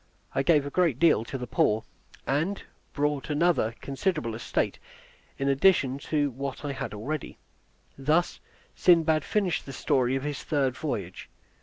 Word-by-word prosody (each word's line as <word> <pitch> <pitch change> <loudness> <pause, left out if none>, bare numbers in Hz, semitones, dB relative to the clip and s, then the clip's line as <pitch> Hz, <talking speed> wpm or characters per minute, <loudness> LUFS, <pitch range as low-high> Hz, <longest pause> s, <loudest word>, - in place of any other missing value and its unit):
I - - +1
gave 150 -1 +3
a 145 - -5
great 170 -8 +2
deal 155 -6 +4
to 135 - -5
the 125 - -5
poor, 110 -1 +1 0.4
and 160 +9 -1 0.3
bought 145 -1 -1
another 150 -7 +2
considerable 140 - -2
estate 115 - -2 0.6
in 135 - -1
addition 140 -2 +3
to 145 -1 0
what 135 +3 -5
I 145 - -2
had 115 -6 -5
already. 140 +8 -5 0.6
Thus 155 +6 +1 0.4
Sindbad 160 -4 +4
finished 195 -9 -1
the 135 - -6
story 130 -2 +1
of 135 - -2
his 145 -1 -3
third 135 -4 0
voyage. 100 - -5
140 Hz, 150 wpm, -27 LUFS, 130-155 Hz, 0.6 s, deal